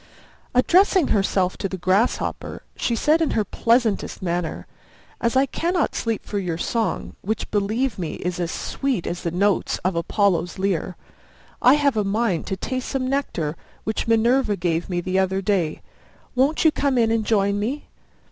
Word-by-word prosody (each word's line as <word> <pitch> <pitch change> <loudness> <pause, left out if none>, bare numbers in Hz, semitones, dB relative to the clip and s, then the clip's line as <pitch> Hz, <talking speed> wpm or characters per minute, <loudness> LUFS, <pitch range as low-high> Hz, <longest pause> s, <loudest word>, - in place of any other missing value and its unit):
Addressing 360 +4 +4
herself 195 -2 +1
to 195 - -2
the 190 - -4
Grasshopper, 185 +6 0
she 235 - 0
said 310 +7 +3
in 320 - +2
her 215 - +2
pleasantest 230 +1 +1
manner, 175 -2 -3 0.6
"As 235 +1 +1
I 265 +1 +5
cannot 340 +5 -1
sleep 225 -2 -2
for 205 - -2
your 175 -4 -2
song, 225 +5 -2
which, 220 +3 -3
believe 215 +3 0
me, 170 -3 -3
is 180 +1 -4
as 170 -2 -1
sweet 260 +1 -2
as 175 - -3
the 170 - -1
notes 195 +3 +1
of 185 -1 +1
Apollo's 175 +1 +1
lyre, 190 -2 -1 0.6
I 255 +3 +7
have 285 -5 +2
a 210 - +2
mind 200 -3 0
to 190 - -2
taste 255 +6 -3
some 260 -1 -1
nectar, 215 - -1 0.3
which 220 +1 -2
Minerva 230 0 +3
gave 170 0 -1
me 175 -1 -1
the 185 +2 0
other 190 0 +1
day. 185 -6 0 0.5
Won't 275 +6 +2
you 320 - +7
come 280 -3 0
in 225 -2 +3
and 225 -1 +1
join 200 -2 +1
me?" 255 +8 -3
210 Hz, 170 wpm, -23 LUFS, 185-255 Hz, 0.6 s, I